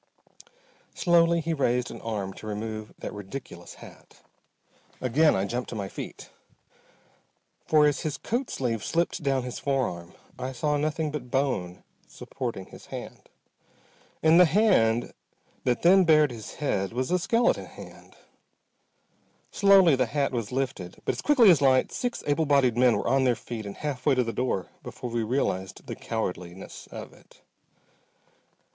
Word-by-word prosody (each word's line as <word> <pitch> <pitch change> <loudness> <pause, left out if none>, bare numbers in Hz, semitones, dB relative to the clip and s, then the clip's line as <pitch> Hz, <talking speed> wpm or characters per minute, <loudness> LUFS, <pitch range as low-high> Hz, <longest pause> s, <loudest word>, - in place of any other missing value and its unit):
Slowly 170 -1 +3
he 165 +1 -2
raised 125 -4 0
an - - -9
arm 100 -4 -4
to 110 - -10
remove 110 0 -5
that - - -6
ridiculous 105 +6 -9
hat. - - -16 0.8
Again 145 +5 +3
I 95 +1 0
jumped 120 +4 -3
to - - -6
my 100 -2 -3
feet. - - -8 1.4
For 155 -1 +5
as 145 -1 +2
his 150 -4 -3
coat 240 - -2
sleeve 115 -5 -2
slipped 170 +1 -1
down 135 -3 0
his 125 -1 -6
forearm 120 -12 -2 0.3
I 130 +1 -4
saw 150 +3 0
nothing 155 +1 -1
but 140 -5 -6
bone 120 -10 -1 0.2
supporting 120 -8 -6
his - - -14
hand. - - -9 0.9
And 160 +2 +6
the 180 - +9
hand 155 - +2 0.5
that 125 -1 0
then 190 +2 +6
bared 155 -4 +4
his 110 -3 -9
head 100 -9 -1
was 130 +5 -2
a 180 - +3
skeleton 230 +7 +1
hand! - - -13 1.4
Slowly 195 -6 +6
the 130 -1 +1
hat 140 +3 0
was 115 -5 -3
lifted, 130 -9 -3
but - - +1
as - - -6
quickly 250 -9 +6
as 155 -5 +3
light 130 -2 +3
six 245 -1 -3
able 145 +2 +1
bodied 135 -5 +3
men 125 -1 +4
were - - -3
on 135 +2 +3
their 125 -2 +3
feet 110 -3 -7
and 100 - -8
half 140 -3 -4
way 140 - +5
to 125 - +2
the 115 -1 -4
door 115 -6 -2
before 120 - -7
we 120 0 -1
realized 105 -6 -2
the - - -6
cowardliness 90 -4 -5
of - - -9
it. - - -22
130 Hz, 160 wpm, -27 LUFS, 115-155 Hz, 1.4 s, the